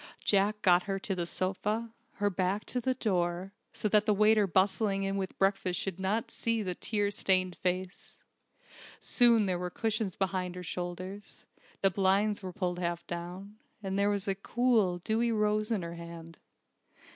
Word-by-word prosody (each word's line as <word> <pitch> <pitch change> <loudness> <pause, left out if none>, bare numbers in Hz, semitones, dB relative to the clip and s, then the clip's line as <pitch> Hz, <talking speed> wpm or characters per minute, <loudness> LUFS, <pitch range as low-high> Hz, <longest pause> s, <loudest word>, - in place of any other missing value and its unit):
Jack 210 +1 +2
got 180 -2 +6
her 195 -1 -1
to 195 +1 -3
the 175 -2 -2
sofa, 210 +6 -2 0.2
her 205 0 0
back 190 +3 -1
to 250 - -2
the 260 +2 0
door, 185 -4 -1 0.2
so - - -2
that 210 +1 +3
the 210 - +4
waiter 210 0 +4
bustling 195 +2 +2
in 195 0 -1
with 190 -1 -3
breakfast 195 -2 +1
should 190 -2 -4
not 205 +4 -1
see 230 -1 -1
the 185 -2 -2
tear 205 +2 -1
stained 185 -2 +2
face. 185 +1 -3 0.8
Soon 235 -4 +4
there 180 -2 0
were 180 0 -3
cushions 215 -1 -2
behind 185 -2 -1
her 180 - -6
shoulders; 185 +3 -6 0.4
the 195 - +5
blinds 200 +3 +2
were 185 -2 -5
pulled 180 -1 -2
half 170 -1 -2
down; 180 +4 -7 0.3
there 200 +1 +1
was 200 -1 0
a 195 - +2
cool, 215 -2 +1
dewy 225 +6 0
rose 215 -1 +1
in 215 -6 0
her 170 0 -5
hand. 170 -1 -10
195 Hz, 170 wpm, -30 LUFS, 180-210 Hz, 0.8 s, got